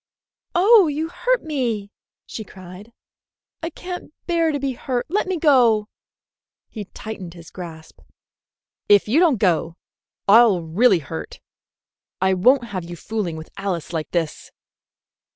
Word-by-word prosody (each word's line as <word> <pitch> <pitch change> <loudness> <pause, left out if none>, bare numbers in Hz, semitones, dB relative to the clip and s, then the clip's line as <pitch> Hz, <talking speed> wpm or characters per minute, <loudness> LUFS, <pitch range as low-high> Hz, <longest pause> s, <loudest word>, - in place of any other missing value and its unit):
"Oh, 395 +1 +6
you 310 +2 -2
hurt - - 0
me!" 235 -9 -2 0.3
she 220 - -7
cried. 185 +2 -12 0.7
"I 330 - -3
can't 360 +1 -8
bear 335 -2 +1
to 285 - -2
be 275 0 -1
hurt! 250 0 -3
Let 400 +4 0
me 375 -1 -1
go!" 240 -9 +4 0.8
He 215 -3 -7
tightened 190 -4 -8
his 170 -1 -13
grasp. 165 -3 -10 0.9
"If 205 0 +6
you 255 +9 +3
don't 330 -8 +4
go, 170 -4 +1 0.5
I'll 205 -4 +6
really 190 +6 +3
hurt. 80 -9 -7 0.8
I 190 0 +2
won't 250 +8 +4
have 185 -3 -4
you 175 +1 -8
fooling 200 -2 -3
with 160 - -10
Alice 185 -4 -3
like 160 -2 -3
this." 165 -3 -3
215 Hz, 135 wpm, -22 LUFS, 180-290 Hz, 0.9 s, Oh